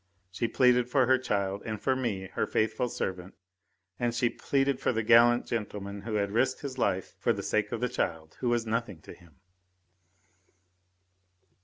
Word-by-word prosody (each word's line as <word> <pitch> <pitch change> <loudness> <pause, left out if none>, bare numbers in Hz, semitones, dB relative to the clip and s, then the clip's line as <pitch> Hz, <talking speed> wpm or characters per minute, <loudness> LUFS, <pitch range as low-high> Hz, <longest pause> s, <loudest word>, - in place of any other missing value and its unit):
She 115 +5 -1
pleaded 125 +1 +3
for 130 0 +3
her 130 +1 +4
child 100 -5 -1
and 110 -1 -4
for 130 +4 +1
me, 105 -8 -3
her - - -1
faithful 110 +3 0
servant, 95 -3 -4 0.6
and 120 -1 0
she 120 0 +1
pleaded 135 -1 0
for - - +1
the 115 -2 -1
gallant 120 +2 +5
gentleman 100 -3 -4
who 110 +1 -4
had 100 -1 0
risked 115 +5 +1
his 130 -3 -6
life 95 -4 0
for - - +2
the - - -5
sake 105 -1 0
of 120 - -3
the 125 - +2
child, 80 -10 -3
who 125 - 0
was 120 -1 +1
nothing 115 -5 -2
to - - -11
him. 85 -5 -20
115 Hz, 175 wpm, -29 LUFS, 100-125 Hz, 0.6 s, gallant